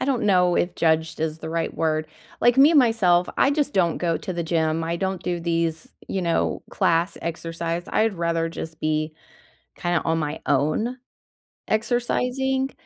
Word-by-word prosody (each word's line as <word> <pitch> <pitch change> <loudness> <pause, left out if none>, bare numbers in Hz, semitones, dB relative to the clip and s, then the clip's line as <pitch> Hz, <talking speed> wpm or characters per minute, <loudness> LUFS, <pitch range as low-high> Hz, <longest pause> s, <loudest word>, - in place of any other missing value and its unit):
I - - 0
don't 265 -4 0
know 180 -3 +3
if 175 - 0
"judged" 160 -1 +1
is 160 0 -2
the 160 0 -6
right 165 0 -1
word. 155 -1 0 0.3
Like, 240 +1 +4
me 285 +4 +7
myself, 210 -10 +4
I 275 - +4
just 290 0 0
don't 175 -3 +2
go 170 -2 0
to 185 - -5
the 170 -1 -2
gym, 160 -1 0
I 170 +1 -2
don't 190 -1 -2
do 175 -1 -2
these, 165 -1 -1 0.2
you 190 - -2
know, 170 -1 0
class 170 +3 +1
exercise, 165 +1 -3
I'd 220 -2 +1
rather 165 -1 0
just 160 -1 -7
be, 155 0 -1 0.6
kinda 175 -1 0
on 165 0 +1
my 150 0 -3
own, 155 - +1 0.7
exercising. 250 +4 0
170 Hz, 170 wpm, -23 LUFS, 160-215 Hz, 0.7 s, me